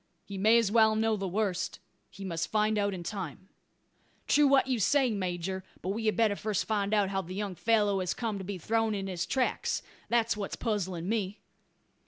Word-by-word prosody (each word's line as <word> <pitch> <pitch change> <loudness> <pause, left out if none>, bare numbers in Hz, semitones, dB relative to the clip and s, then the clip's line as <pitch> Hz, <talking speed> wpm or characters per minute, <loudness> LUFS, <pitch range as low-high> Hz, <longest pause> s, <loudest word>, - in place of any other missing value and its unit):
"He 200 - -7
may 215 +4 +5
as 225 -4 +2
well 220 -1 +5
know 220 0 +2
the 195 -2 -3
worst. 190 -1 -1 0.3
He 195 - -9
must 165 -2 -2
find 215 0 +2
it - - +2
out 200 -1 0
in 175 - -6
time." 185 -2 -6 0.8
"True 295 0 +5
what 275 -1 +5
you 255 -3 0
say, 260 +5 +3
major; 190 -1 -3 0.2
but 185 - -2
we 220 +3 -1
had 215 - +1
better 220 -3 +3
first 210 -1 -1
find 205 -2 0
out 205 -3 +3
how 195 0 -1
the 185 +1 -8
young 200 -1 -3
fellow 205 0 +2
has 180 -2 -1
come 220 -4 -2
to - - -5
be 195 +1 -4
thrown 225 +4 0
in 195 -1 -3
his 175 -2 -3
tracks. 260 +4 0 0.3
That's 230 -1 +2
what 205 -2 -4
is - - -1
puzzling 190 -6 -2
me." 205 -2 -1
205 Hz, 215 wpm, -30 LUFS, 190-220 Hz, 0.8 s, may